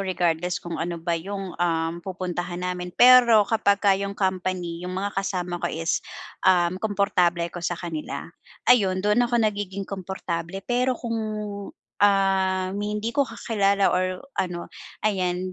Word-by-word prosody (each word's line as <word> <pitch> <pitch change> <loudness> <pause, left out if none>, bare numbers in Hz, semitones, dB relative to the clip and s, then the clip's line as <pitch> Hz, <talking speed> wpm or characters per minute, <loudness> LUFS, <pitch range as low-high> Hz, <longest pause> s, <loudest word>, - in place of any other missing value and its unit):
regardless 180 -2 0
kung 170 -2 -5
ano 170 +1 -2
ba 170 +1 -2
'yong, 190 +2 -4
um, 165 -1 +1
pupuntahan 180 -1 -4
namin. 180 0 -3
Pero 240 -4 +8
kapagka 200 -2 +3
'yong 200 +1 -2
company, 185 -3 -2
'yong 180 +1 -5
mga 200 +1 -2
kasama 180 -2 -2
ko - - -1
is, 165 +1 -1 0.4
um, 185 0 +3
komportable 195 -5 +1
ako 170 +1 -6
sa 175 0 -2
kanila, 165 -3 -5 0.4
ayun 195 -6 +4
do'n 210 +3 +3
ako 240 - +1
nagiging 200 -2 -2
komportable. 190 -1 -5
Pero 250 0 +1
kung, 230 -2 -3 0.8
um, 190 -2 +2
hindi 210 +2 -2
ko 280 -2 +1
kakilala 200 -4 +1
or 185 +2 -1 0.2
ano, 175 -2 -4 0.3
ayan, 185 -2 0
185 Hz, 140 wpm, -24 LUFS, 175-200 Hz, 0.8 s, Pero